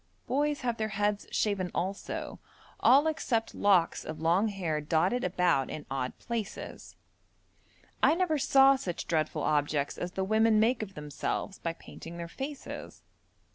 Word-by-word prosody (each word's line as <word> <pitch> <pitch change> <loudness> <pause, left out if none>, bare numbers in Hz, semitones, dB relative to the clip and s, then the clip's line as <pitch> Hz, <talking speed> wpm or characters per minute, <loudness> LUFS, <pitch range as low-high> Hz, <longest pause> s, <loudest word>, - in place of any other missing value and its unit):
Boys 290 +2 0
have 240 -2 -1
their 220 - -1
heads 205 0 0
shaven 200 -4 0
also, 190 +3 -3 0.4
all 275 +4 +6
except 255 -8 0
locks 190 -5 +3
of 155 - -6
long 170 +7 +3
hair 175 -7 -2
dotted 175 +10 +1
about 180 -7 +2
in 150 - -6
odd 130 -2 -2
places. 230 -3 -6 1.1
I 315 - +5
never 335 -4 +1
saw 270 0 +6
such 175 -8 -4
dreadful 155 -2 0
objects 145 -1 0
as 180 +1 -4
the 190 - -1
women 220 +2 +3
make 230 +2 +3
of 195 -3 -6
themselves 150 +6 -4
by 165 - -2
painting 165 0 -11
their 170 0 -5
faces. 275 - -7
195 Hz, 145 wpm, -30 LUFS, 165-235 Hz, 1.1 s, all